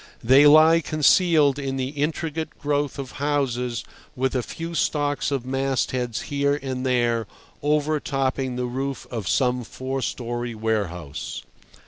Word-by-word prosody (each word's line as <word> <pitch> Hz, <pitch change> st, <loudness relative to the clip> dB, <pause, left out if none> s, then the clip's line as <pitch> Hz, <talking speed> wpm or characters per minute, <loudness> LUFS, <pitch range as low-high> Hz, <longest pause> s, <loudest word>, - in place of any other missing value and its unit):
They 135 Hz, +5 st, +7 dB
lie 160 Hz, +2 st, +7 dB
concealed 155 Hz, -1 st, +3 dB
in 135 Hz, -1 st, -3 dB
the 130 Hz, 0 st, -2 dB
intricate 155 Hz, +2 st, -3 dB
growth 145 Hz, -1 st, -1 dB
of 135 Hz, -2 st, -6 dB
houses 125 Hz, -5 st, -1 dB, 0.3 s
with 130 Hz, +1 st, 0 dB
a 125 Hz, -, +2 dB
few 165 Hz, +7 st, -6 dB
stalks 145 Hz, -2 st, 0 dB
of 135 Hz, -3 st, -2 dB
mastheads 130 Hz, -3 st, -1 dB
here 140 Hz, 0 st, 0 dB
and 130 Hz, -2 st, -4 dB
there 120 Hz, -4 st, +1 dB, 0.3 s
overtopping 140 Hz, -3 st, 0 dB
the 125 Hz, 0 st, -2 dB
roof 135 Hz, +2 st, -4 dB
of 115 Hz, -7 st, -4 dB
some 125 Hz, +2 st, +1 dB
four 130 Hz, +3 st, -4 dB
story 120 Hz, -1 st, -3 dB
warehouse. 100 Hz, -9 st, -3 dB
135 Hz, 130 wpm, -24 LUFS, 125-145 Hz, 0.3 s, They